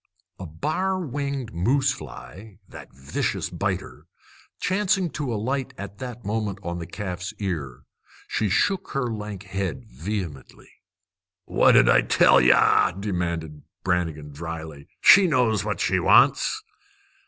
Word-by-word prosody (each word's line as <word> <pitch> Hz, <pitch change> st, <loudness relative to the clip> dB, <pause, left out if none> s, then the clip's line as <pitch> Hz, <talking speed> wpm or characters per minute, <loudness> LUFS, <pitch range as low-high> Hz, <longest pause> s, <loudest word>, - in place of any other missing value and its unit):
A 95 Hz, -, -6 dB
bar 170 Hz, -, -2 dB
winged 140 Hz, -5 st, -4 dB
moose 130 Hz, +11 st, +2 dB
fly, 100 Hz, +1 st, -10 dB
that -, -, -12 dB
vicious 65 Hz, +2 st, -3 dB
biter, -, -, -4 dB, 0.5 s
chancing 190 Hz, -2 st, +1 dB
to 140 Hz, -4 st, -3 dB
alight 130 Hz, +4 st, -2 dB
at 100 Hz, 0 st, -8 dB
that 120 Hz, -3 st, -7 dB
moment 105 Hz, -1 st, -2 dB
on 85 Hz, 0 st, -4 dB
the 85 Hz, -, -6 dB
calf's 90 Hz, -1 st, -5 dB
ear, 75 Hz, -11 st, -4 dB, 0.4 s
she 105 Hz, -, -1 dB
shook 190 Hz, -, 0 dB
her 125 Hz, -4 st, -1 dB
lank 105 Hz, -2 st, -6 dB
head 95 Hz, -3 st, -4 dB
vehemently. 80 Hz, -, -6 dB, 0.7 s
"What -, -, +4 dB
did -, -, +6 dB
I -, -, +6 dB
tell -, -, +5 dB
ye?" 65 Hz, +1 st, +6 dB, 0.5 s
demanded 85 Hz, -6 st, -3 dB, 0.2 s
Brannigan 85 Hz, -5 st, -1 dB
dryly. 80 Hz, -1 st, -7 dB
"She 195 Hz, -1 st, +8 dB
knows 120 Hz, -9 st, +2 dB
what 105 Hz, 0 st, -3 dB
she -, -, +1 dB
wants!" 435 Hz, -, +4 dB
100 Hz, 130 wpm, -24 LUFS, 85-130 Hz, 0.7 s, She